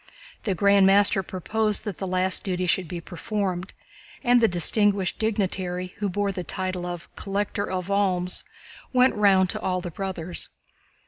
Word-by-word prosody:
The 195 -4 0
Grand 200 +1 +5
Master 200 0 +5
proposed 210 +4 -1
that 205 -5 -5
the 190 - -3
last 185 0 0
duty 185 -1 -1
should 180 0 +1
be 175 +2 -5
performed, 185 +1 -3 0.5
and 245 -2 +5
the 225 - +6
distinguished 195 +1 +2
dignitary 185 -4 -1
who 205 -1 0
bore 200 +2 0
the 180 -2 -4
title 185 0 -3
of 175 -1 -6
"Collector 200 0 -2
of 185 +1 -3
Alms" 185 -3 +1 0.5
went 255 +1 +5
round 195 -3 +4
to - - -4
all 185 -1 0
the 175 -1 -6
brothers. 180 -1 -5
190 Hz, 155 wpm, -25 LUFS, 180-205 Hz, 0.5 s, the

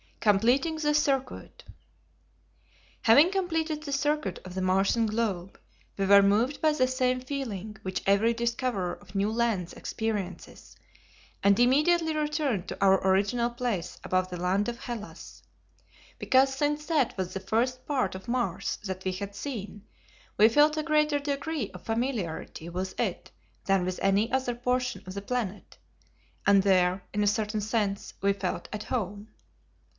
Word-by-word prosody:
Completing 245 +10 +2
the 300 -1 +1
Circuit. 275 -3 -1 1.4
Having 290 +11 +6
completed 325 -5 -1
the 285 - -5
circuit 280 - 0
of 185 - -8
the 190 - -3
Martian 195 +5 +2
globe, 205 -5 -2 0.4
we 195 - 0
were 200 +1 +7
moved 220 +8 +2
by 310 -1 +3
the 255 -4 +2
same 255 -1 +1
feeling 220 -7 -5
which 185 -2 -3
every 200 +4 +3
discoverer 235 -5 -1
of 185 - -14
new 200 +2 +1
lands 225 -6 0
experiences, 210 -5 -5 0.7
and 200 +1 +4
immediately 310 +6 +3
returned 300 - -1
to - - -4
our 190 -1 +5
original 205 +5 +2
place 235 -7 -3
above 185 0 0
the 180 - -5
land 190 +3 +1
of 235 -1 -6
Hellas, 235 -5 -8 0.8
because 270 +1 +3
since 295 +1 -1
that 300 -7 +1
was 185 -1 -3
the 195 - -3
first 250 +6 -1
part 275 -4 0
of 190 +4 -9
Mars 245 0 -1
that 190 -2 -5
we 185 - -1
had 200 +2 -6
seen, 210 -5 -6 0.5
we 215 +2 +7
felt 300 +5 +4
a 310 - 0
greater 300 -1 +2
degree 285 -3 -3
of 180 - -11
familiarity 225 -9 -3
with 185 +2 -5
it - - -2 0.3
than 195 -2 +2
with 185 0 -3
any 195 +3 +2
other 255 -2 0
portion 250 -4 -1
of 185 - -6
the 200 - -4
planet, 210 -2 -4 0.7
and 200 -1 +6
there, 185 -1 +2
in 210 0 +1
a - - +2
certain 210 +1 0
sense, 205 -2 -2
we 200 0 +3
felt 200 - -4
"at 210 0 -4
home." 205 -3 -3
225 Hz, 155 wpm, -28 LUFS, 195-270 Hz, 1.4 s, were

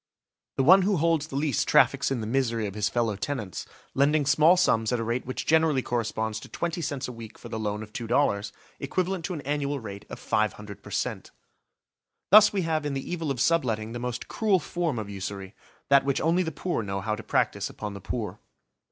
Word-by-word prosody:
The 135 - +1
one 185 +7 +8
who 195 0 +2
holds 160 -1 +1
the 135 - -8
lease 140 -4 +1
traffics - - +4
in 135 -4 -1
the - - -3
misery 115 -2 0
of 100 - -4
his 105 0 0
fellow 115 -3 0
tenants, 105 -5 -4 0.3
lending 145 +2 +3
small 155 +5 +5
sums 115 -11 +2
at 125 - 0
a - - -1
rate 120 +2 -2
which 130 - -4
generally 160 -4 +3
corresponds 110 -2 -2
to - - -12
twenty 170 0 -3
cents 145 -3 -3
a - - -5
week 115 -2 -10
for - - -11
the 110 - -4
loan 105 0 -2
of 105 -1 -13
two 115 - -5
dollars, 105 -5 +1 0.3
equivalent 185 +5 -1
to 180 - -3
an 150 - -5
annual 145 0 -2
rate 100 -4 -8
of - - -7
500 105 -1 -2
per - - -12
cent. - - -3 1.0
Thus 210 +1 +9
we 195 -3 -1
have 160 -2 0
in 145 -1 -2
the 135 - -5
evil 165 -4 -2
of 135 -3 -2
subletting 115 -8 +1
the 120 - -5
most 125 0 -4
cruel 210 -4 +2
form 170 -4 -2
of 110 -2 -4
usury: 100 0 -6 0.4
that 140 0 +6
which 140 -1 0
only 170 +3 +2
the 160 -3 -2
poor 175 -4 -2
know 100 -2 -3
how 110 +2 -1
to 105 - -4
practise - - 0
upon 105 -1 -6
the 100 - -8
poor. 105 0 -4
130 Hz, 220 wpm, -27 LUFS, 110-155 Hz, 1.0 s, Thus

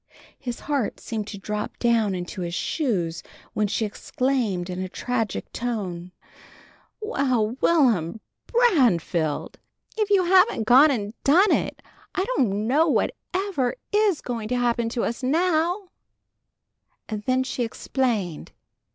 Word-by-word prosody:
His 245 -2 -5
heart 280 -7 -1
seemed 220 -3 -4
to 205 - -7
drop 210 +2 -4
down 230 -5 +2
into 180 +1 -5
his 170 0 -3
shoes 180 - -1 0.3
when 210 -1 +1
she 215 +2 -1
exclaimed 220 -4 -1
in 180 -1 -5
a 185 - -4
tragic 225 0 -3
tone: 185 -7 -4 0.9
"Well, 255 - 0
Will'm 225 - +3 0.3
Branfield! 235 - +2 0.4
If 425 -1 +1
you 395 -2 +4
haven't 370 - +4
gone 260 +7 +7
and 215 -6 -2
done 360 +8 +5
it! - - -1 0.3
I 375 - +1
don't 210 -4 +1
know 295 +8 +3
what 300 - +1 0.2
ever 370 - -1 0.2
is 415 -5 +2
going 230 -3 -4
to 250 +2 -1
happen 235 -1 +1
to 235 0 -2
us 235 - -2
now!" 345 +6 +1 1.2
Then 250 +4 0
she 260 -1 -2
explained. 225 - -2
240 Hz, 130 wpm, -24 LUFS, 205-300 Hz, 1.2 s, gone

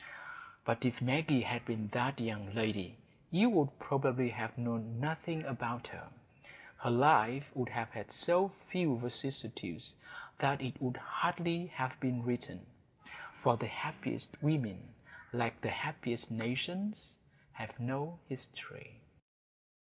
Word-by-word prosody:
But - - +1
if 125 -1 +2
Maggie 135 +1 +3
had 120 +2 -1
been 110 -3 -2
that 125 +4 +1
young 105 -3 -3
lady, 110 -3 0 0.3
you 215 +9 +6
would 150 -8 +4
probably 130 -3 +2
have 110 0 -4
known 115 -1 -2
nothing 160 +2 -2
about 120 -2 -3
her: - - -10 0.7
her - - 0
life 135 +1 +6
would 125 -3 -1
have 120 -1 -2
had 105 -4 -7
so 180 +3 +5 0.2
few 170 - +2
vicissitudes 120 0 -1 0.5
that 140 0 +3
it 130 -3 -4
could 125 -1 -1
hardly 170 0 0
have 130 -6 -3
been 125 -2 0
written; 120 0 -3 0.8
for - - +6
the - - -2
happiest - - -4
women, 140 - 0 0.4
like - - 0
the - - -1
happiest 120 -1 -2
nations, 135 - -2 0.3
have - - -9
no 140 +7 -2
history. 130 -1 -9
125 Hz, 125 wpm, -35 LUFS, 120-150 Hz, 0.8 s, you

